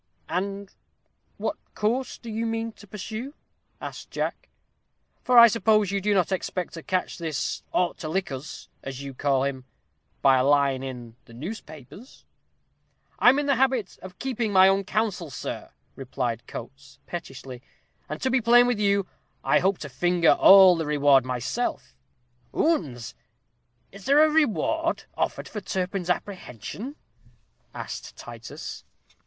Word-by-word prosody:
"And 195 +1 -3 0.6
what - - -2 0.2
course 240 +5 -1
do 235 - -9
you 225 +1 -2
mean 225 0 -2
to 205 - -16
pursue?" 220 +8 -6 0.4
asked - - -8
Jack, - - -4 0.7
"for 250 -1 +3
I 235 0 +11
suppose 215 -3 +2
you 200 0 -1
do 205 +1 +1
not 185 0 +2
expect 185 -1 -3
to 165 - -7
catch 185 +2 -2
this 160 -4 -2
'ought 180 -1 0
to 155 - -5
lick 185 -1 -1
us,' 135 +4 -7
as 135 0 -7
you 140 -1 -7
call 135 0 +1
him, 135 -2 -3 0.6
by 135 -1 +6
a - - +2
line 140 -1 +3
in 120 -3 -8
the 115 - -15
newspapers." 160 - -10 0.9
"I - - +7
am 265 - +4
in 290 - 0
the 280 -3 +2
habit 255 -6 0
of 185 0 -11
keeping 240 -5 -2
my 190 -1 +7
own 195 0 +2
counsel, 205 -7 -1
sir," - - -6 0.3
replied 125 -3 -4
Coates, 135 +3 -10
pettishly; 135 -7 -7 0.5
"and - - -4
to 260 - +1
be 260 0 +3
plain 240 +2 +6
with 245 -3 0
you, 200 -1 +2 0.4
I - - +4
hope 195 0 +1
to 145 - -5
finger 175 +4 +3
all 190 -2 +8
the 160 -2 -2
reward 145 -3 +4
myself." 125 - -3 0.6
"Oons, 140 - 0 0.8
is 195 0 -13
there 290 +3 +6
a 310 - +5
reward 320 +3 +1
offered - - -2
for 210 - -6
Turpin's 185 -1 -3
apprehension?" 195 - -4 0.8
asked - - -7
Titus. - - -8
185 Hz, 150 wpm, -26 LUFS, 140-225 Hz, 0.9 s, I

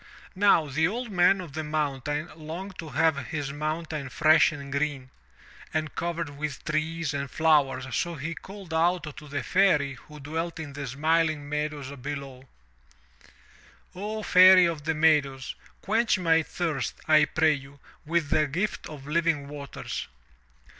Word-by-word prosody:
Now 195 -4 +4
the 155 +3 +1
Old 235 +4 -4
Man 190 +1 +4
of 170 -6 -8
the 155 +1 -3
Mountain 150 +1 -2
longed 170 +5 -8
to 160 - -6
have 145 -2 +1
his 145 -1 -4
mountain 155 -1 -3
fresh 155 +4 +5
and 140 -2 -8
green, 140 -2 -2 0.6
and 155 -1 -1
covered 170 -2 -3
with 150 -3 -5
trees 155 0 -1
and 140 -1 -3
flowers, 145 -5 +2
so 170 -1 -1
he 155 +3 -4
called 195 -1 -10
aloud 165 -2 +1
to 150 - -10
the 145 -1 -3
Fairy 160 -8 +3
who 150 +4 -13
dwelt 160 +4 -4
in 150 -3 -6
the 140 -1 -5
smiling 155 +2 +1
meadows 150 -2 -3
below: 135 -1 -7 1.4
"O 210 +3 -4
Fairy 185 -1 +8
of 160 -4 -2
the 160 0 0
Meadows, 145 -4 +2 0.3
quench 220 +2 +2
my 165 -3 +3
thirst, 160 -3 -3
I 155 -1 +6
pray 155 +1 +3
you, 140 0 -9 0.3
with 165 -1 0
a 155 -1 +3
gift 180 +9 -3
of 145 -3 -10
living 155 -2 0
waters! 140 -1 -6
155 Hz, 150 wpm, -27 LUFS, 145-165 Hz, 1.4 s, Fairy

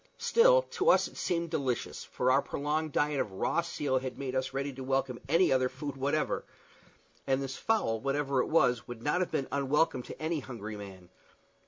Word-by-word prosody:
Still - - +5
to 400 +6 +1
us - - +5
it - - -15
seemed 170 -2 -1
delicious, 130 -7 -2
for 125 +1 0
our 135 +2 +4
prolonged 150 +3 -2
diet 145 0 +1
of 100 - -2
raw 95 - +1
seal 145 -5 -1
had 130 -2 -6
made 135 -2 -4
us 130 0 -1
ready 140 +1 -3
to 130 +1 -7
welcome 135 -1 -1
any 165 +2 +4
other 130 -1 +3
food 140 +2 -6
whatever; 140 +3 0 0.8
and 135 0 +2
this 135 -1 -4
fowl, 160 - +1
whatever 140 0 0
it - - -2
was, 125 -8 +2
would 120 -1 -8
not 150 +4 +1
have 180 - 0
been 135 - -1
unwelcome 140 +2 +1
to - - -10
any 160 0 -1
hungry 110 -5 -7
man. 95 -3 -10
135 Hz, 195 wpm, -30 LUFS, 130-155 Hz, 0.8 s, Still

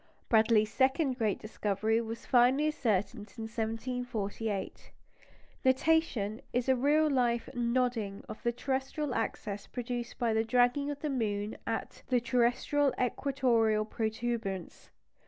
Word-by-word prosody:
Bradley's 220 -1 +4
second 265 0 +2
great 215 -4 +1
discovery 215 +1 -1
was 225 0 -6
finally 260 +5 +4
ascertained 210 -5 -1
in 225 - -5
1748. 225 -2 -3 0.7
Nutation 260 -5 +2
is 245 +1 0
a 265 - +4
real 295 +5 +3 0.5
"nodding" 235 -4 -1
of - - -8
the 235 - +1
terrestrial 265 +3 -2
axis 210 -3 -3
produced 245 -1 -5
by 235 -2 +1
the 220 0 +2
dragging 245 +4 +2
of 290 -1 -5
the 305 - -1
moon 210 -4 -1
at 225 - -3
the 250 -1 +3
terrestrial 250 +4 +2
equatorial 240 -4 +1
protuberance. 220 -4 -3
235 Hz, 120 wpm, -31 LUFS, 220-260 Hz, 0.7 s, Bradley's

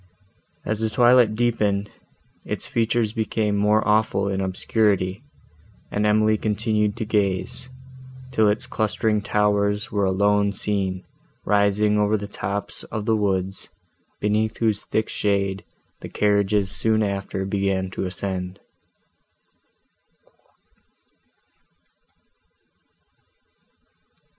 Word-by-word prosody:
As 110 0 -1
the 110 0 0
twilight 120 0 +4
deepened, 105 -4 0 0.6
its - - -3
features 115 -1 0
became 110 -2 -1
more 105 +2 +2
awful 105 -2 +2
in 95 0 -1
obscurity, 95 +1 0 0.7
and 105 +1 +1
Emily 110 0 +3
continued 105 0 0
to 115 - -3
gaze, 105 +3 -1 0.6
till 110 -4 +3
its 105 +1 -1
clustering 110 0 0
towers 105 +1 +1
were 100 -1 0
alone 100 +1 +2
seen, 95 -3 -1 0.4
rising 105 +1 +2
over 105 +1 +2
the 100 0 -6
tops 100 0 -3
of 110 -1 -5
the 110 - +2
woods, 95 -2 -1 0.5
beneath 110 +1 0
whose 110 -3 0
thick 110 - -1
shade 100 -2 -1 0.4
the - - -8
carriages 100 -1 +1
soon 110 -1 +1
after 100 -1 -3
began 95 -1 -1
to 95 - -3
ascend. 90 0 -4
105 Hz, 100 wpm, -23 LUFS, 100-110 Hz, 0.7 s, twilight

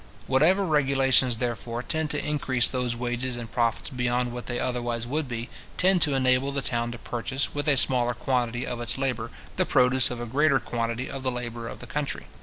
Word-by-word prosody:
Whatever 170 +9 +4
regulations, 135 -5 +3
therefore, 120 0 -3
tend 160 +1 -1
to 145 0 -1
increase 135 -5 +2
those 125 -2 -1
wages 120 +1 -2
and 115 -3 -7
profits 115 +4 0
beyond 125 -1 0
what 120 0 -7
they 120 - -2
otherwise: 120 -2 -2
would 145 +4 -2
be, 120 -1 -4 0.3
tend 185 -1 +3
to 145 -3 +3
enable 130 +1 +3
the 140 -1 -2
town 120 -1 -1
to 120 - -7
purchase, 130 +4 -3
with 145 +1 -2
a 145 -2 +4
smaller 120 -2 +3
quantity 120 -1 -1
of 120 -2 -4
its 120 +1 -1
labour, 125 -4 -1 0.3
the - - +3
produce 125 0 +4
of 125 - -5
a 120 - -4
greater 140 +3 +3
quantity 115 +1 -3
of 135 - -5
the 130 -1 +1
labour 120 -1 -5
of - - -8
the - - -8
country. 140 +1 -3
125 Hz, 205 wpm, -26 LUFS, 120-135 Hz, 0.3 s, Whatever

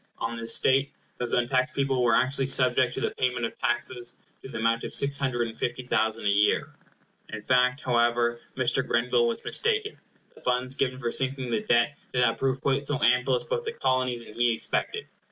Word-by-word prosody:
On 115 +1 -3
this 115 0 +1
state, 135 +1 +3 0.3
those 120 -1 -2
untaxed 130 +1 +1
people 135 -2 +1
were 115 -2 +4
actually 135 +1 +1
subject 130 -2 +1
to - - -4
the - - 0
payment 125 -2 -1
of - - -5
taxes 120 0 -2 0.3
to - - -10
the - - -6
amount 115 +1 +1
of - - -5
six 140 0 +1
hundred 120 -3 0
and 115 - -9
fifty 120 +2 -3
thousand 110 -2 0
a - - +3
year. 100 +1 +2 0.6
In 110 -1 -6
fact, 125 +3 +2
however, 120 -1 +1 0.2
Mr. 130 +1 +1
Grenville 120 0 +2
was 115 - -3
mistaken. 430 -2 0 0.3
The - - -18
funds 125 +1 -1
given 130 -2 -1
for 120 -3 -3
sinking 130 -2 -2
the 210 - 0
debt 130 - +1
did 125 - +2
not 120 - +2
prove 130 -1 0
quite 140 +1 0
so 145 0 -1
ample 125 +2 +3
as 125 - -2
both 475 - -2
the 450 0 -4
Colonies 130 - 0
and 110 -2 -13
he 120 -1 +2
expected. - - -2
125 Hz, 205 wpm, -27 LUFS, 120-130 Hz, 0.6 s, were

